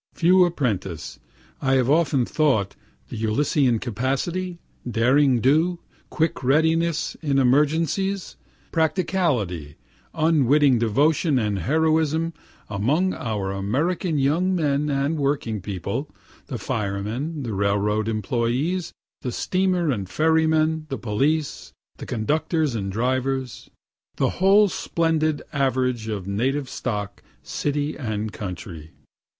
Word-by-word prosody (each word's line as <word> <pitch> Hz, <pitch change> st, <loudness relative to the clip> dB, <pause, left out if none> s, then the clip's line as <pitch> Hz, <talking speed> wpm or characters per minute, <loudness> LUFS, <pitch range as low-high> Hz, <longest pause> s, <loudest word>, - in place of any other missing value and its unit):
(Few 180 Hz, +2 st, +5 dB
appreciate, 95 Hz, -, -3 dB, 0.4 s
I 135 Hz, -1 st, +1 dB
have 130 Hz, -2 st, +3 dB
often 145 Hz, -4 st, +3 dB
thought, 130 Hz, -12 st, +1 dB, 0.3 s
the 110 Hz, -, -5 dB
Ulyssean 125 Hz, +2 st, +2 dB
capacity, 135 Hz, -, -2 dB, 0.3 s
derring 125 Hz, +2 st, +3 dB
do, 160 Hz, +8 st, +3 dB, 0.3 s
quick 160 Hz, -4 st, -1 dB
readiness 160 Hz, +3 st, +2 dB
in 145 Hz, -4 st, 0 dB
emergencies, 160 Hz, +8 st, +1 dB, 0.4 s
practicality, 155 Hz, -, 0 dB, 0.4 s
unwitting 145 Hz, -4 st, +4 dB
devotion 145 Hz, -, +2 dB
and 105 Hz, -4 st, 0 dB
heroism, 160 Hz, -, +1 dB, 0.3 s
among 140 Hz, -, +1 dB
our 105 Hz, -4 st, -3 dB
American 150 Hz, -, -1 dB
young 165 Hz, +7 st, +2 dB
men 150 Hz, -3 st, 0 dB
and 140 Hz, +3 st, 0 dB
working 135 Hz, -7 st, -1 dB
people 100 Hz, -, -4 dB, 0.4 s
the 130 Hz, -, -4 dB
firemen, 115 Hz, +7 st, -3 dB
the 115 Hz, -3 st, -3 dB
railroad 100 Hz, +2 st, 0 dB
employes, 120 Hz, -, -1 dB, 0.3 s
the 125 Hz, -, -3 dB
steamer 180 Hz, 0 st, 0 dB
and 100 Hz, -7 st, -3 dB
ferry 160 Hz, +3 st, +2 dB
men, 155 Hz, 0 st, +1 dB
the 135 Hz, -, -3 dB
police, 140 Hz, +8 st, -1 dB, 0.2 s
the -, -, -8 dB
conductors 150 Hz, +5 st, 0 dB
and 100 Hz, -4 st, -3 dB
drivers 130 Hz, +3 st, -2 dB, 0.5 s
the -, -, +1 dB
whole 200 Hz, +2 st, +6 dB
splendid 160 Hz, -4 st, 0 dB
average 130 Hz, -4 st, 0 dB
of 105 Hz, -4 st, -4 dB
native 130 Hz, +8 st, -1 dB
stock, 105 Hz, -4 st, -4 dB, 0.2 s
city 145 Hz, +1 st, -2 dB
and 110 Hz, -5 st, -3 dB
country.) 90 Hz, -5 st, -7 dB
135 Hz, 110 wpm, -23 LUFS, 110-160 Hz, 0.5 s, whole